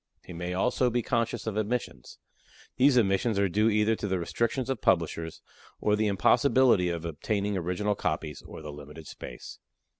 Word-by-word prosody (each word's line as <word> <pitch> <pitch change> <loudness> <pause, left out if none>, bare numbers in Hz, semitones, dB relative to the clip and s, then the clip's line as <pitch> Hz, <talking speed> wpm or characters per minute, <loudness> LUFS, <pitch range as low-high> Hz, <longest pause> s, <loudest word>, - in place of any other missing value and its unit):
He - - -9
may 90 +2 -4
also 125 +5 +2
be 120 0 -1
conscious 115 -2 -1
of 110 -2 -3
omissions. 110 +3 -3 0.6
These 130 0 +5
omissions 105 0 +2
are 100 0 +3
due 105 +5 +2
either 105 +1 +2
to 105 - -3
the 95 -1 0
restrictions 115 +8 -1
of 135 -4 -2
publishers, 85 -2 0 0.4
or 105 - +2
the 110 0 +1
impossibility 115 -1 +4
of 85 -1 -4
obtaining 100 +6 -2
original 90 +4 -1
copies, 75 -6 -3
or - - -11
the 75 -1 -7
limited 75 +2 -11
space. - - -9
100 Hz, 170 wpm, -28 LUFS, 85-115 Hz, 0.6 s, These